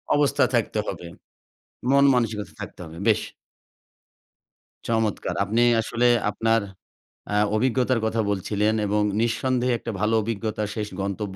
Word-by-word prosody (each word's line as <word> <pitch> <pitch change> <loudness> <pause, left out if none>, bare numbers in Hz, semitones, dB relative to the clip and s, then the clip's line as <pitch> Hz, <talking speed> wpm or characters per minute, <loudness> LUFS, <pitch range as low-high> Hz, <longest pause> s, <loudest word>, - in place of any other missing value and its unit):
অবস্থা 145 -1 +3
থাকতে - - 0
হবে। 85 - -5 0.9
মন 140 0 +5
মানসিকতা 110 -5 -1
থাকতে - - -8
হবে। 80 0 -11
বেশ। 110 - +4 1.7
চমৎকার। 110 -2 -1
আপনি 110 +4 +1 0.2
আসলে 115 +2 +1 0.2
আপনার 115 0 +1 0.7
আ - - +1 0.2
অভিজ্ঞতার 125 +1 +1
কথা 110 0 0
বলছিলেন 105 +2 0
এবং 105 +1 +1 0.2
নিঃসন্দেহে 125 +1 +1
একটা 115 - -5
ভালো 110 +1 +1
অভিজ্ঞতার 110 -1 -3
শেষ 105 -1 -3
গন্তব্য 100 0 -4
110 Hz, 120 wpm, -24 LUFS, 105-120 Hz, 1.7 s, মন